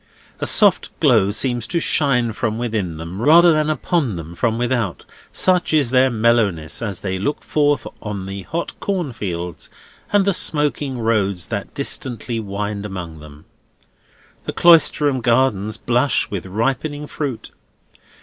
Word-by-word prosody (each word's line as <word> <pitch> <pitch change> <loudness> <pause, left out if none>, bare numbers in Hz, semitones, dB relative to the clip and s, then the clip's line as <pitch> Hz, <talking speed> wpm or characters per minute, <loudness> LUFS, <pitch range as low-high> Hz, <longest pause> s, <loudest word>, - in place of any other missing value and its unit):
A - - -1
soft 205 -4 +4
glow 115 -10 +4
seems 120 +2 0
to 170 - -1
shine 125 -8 +1
from 110 0 -2
within 110 -9 -2
them, 85 +5 -7
rather 165 +5 +6
than 155 0 +1
upon 155 - 0
them 85 0 -7
from 115 +5 0
without, 120 -6 -1 0.3
such 180 -3 +2
is 140 -6 +2
their 130 0 +4
mellowness 110 -9 +1
as 100 -6 -4
they 95 -1 -3
look 145 +10 -2
forth 145 -4 +1 0.2
on 100 -3 -5
the 95 0 -6
hot 170 - -4
corn 180 -9 -2
fields 90 -5 -5 0.4
and 205 -2 +3
the 200 - +2
smoking 145 -5 -1
roads 100 -6 0
that 100 -3 -5
distantly 120 -4 -3
wind 100 0 -4
among 90 -6 -7
them. 75 0 -14 1.0
The - - -4
Cloisterham 150 -5 +4
gardens 115 -4 +1
blush 125 +4 +1
with 95 -2 -4
ripening 135 +8 -2
fruit. 140 -5 -5
115 Hz, 145 wpm, -20 LUFS, 100-145 Hz, 1.0 s, rather